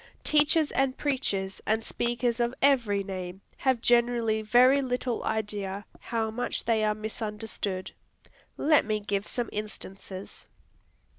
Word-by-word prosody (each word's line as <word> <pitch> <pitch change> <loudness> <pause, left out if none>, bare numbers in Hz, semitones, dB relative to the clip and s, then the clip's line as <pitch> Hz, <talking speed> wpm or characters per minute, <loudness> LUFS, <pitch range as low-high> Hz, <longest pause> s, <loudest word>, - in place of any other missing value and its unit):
Teachers 300 +1 +4
and 270 -1 +1
preachers 200 -9 -1
and 220 +1 +2
speakers 240 0 -1
of 240 +1 0
every 235 -8 +3
name 185 -1 -6 0.2
have 260 -3 +1
generally 235 -2 +3
very 250 +5 +5
little 250 -2 -2
idea 205 -2 -2
how 225 -1 -2
much 245 +3 -2
they 225 -2 +2
are 210 0 +2
misunderstood. 210 -3 -4 0.7
Let 305 0 +4
me 215 -1 -1
give 205 -1 -2
some 240 -2 -2
instances. 195 -2 -7
220 Hz, 125 wpm, -28 LUFS, 205-245 Hz, 0.7 s, very